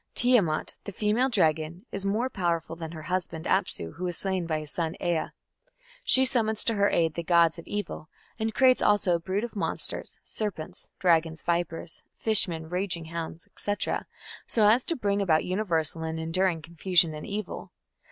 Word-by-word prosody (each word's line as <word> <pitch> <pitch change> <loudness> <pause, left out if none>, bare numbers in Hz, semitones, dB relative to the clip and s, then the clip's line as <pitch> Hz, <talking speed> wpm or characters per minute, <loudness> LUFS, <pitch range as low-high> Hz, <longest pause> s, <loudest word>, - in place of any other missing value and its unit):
Tiamat, 225 -11 +2
the 200 - -5
female 215 +6 +1
dragon, 165 - +1
is 195 0 -3
more 220 +6 +1
powerful 170 -7 -2
than 165 -1 -7
her 155 -2 -8
husband 170 -1 -3
Apsu, 185 - 0
who 180 +1 -2
is 175 - -3
slain 190 -3 -1
by 160 -1 0
his 150 - -5
son 165 0 -2
Ea. 170 -3 0 0.8
She 260 0 +5
summons 225 -4 +2
to 230 - +1
her 200 -1 +3
aid 165 -2 +2
the 170 - -3
gods 170 -1 +3
of 170 - -12
evil, 205 -6 -4 0.3
and 220 0 0
creates 255 +2 +4
also 205 -3 +3
a 170 - +2
brood 190 +5 -2
of 240 - -5
monsters 200 - -2
serpents, 200 -8 -5
dragons, 165 -4 +2
vipers, 170 -1 -2 0.2
fish 220 -2 +4
men, 160 -2 -5
raging 180 -1 -2
hounds, 165 0 -6
&c. 205 - +1 0.7
so 215 -3 +4
as 235 +4 +5
to 335 - +1
bring 200 -5 0
about 160 -5 +2
universal 170 -5 -1
and 160 0 -3
enduring 165 0 +1
confusion 170 0 +3
and 150 - -7
evil. 210 +1 -5
175 Hz, 175 wpm, -27 LUFS, 165-205 Hz, 0.8 s, She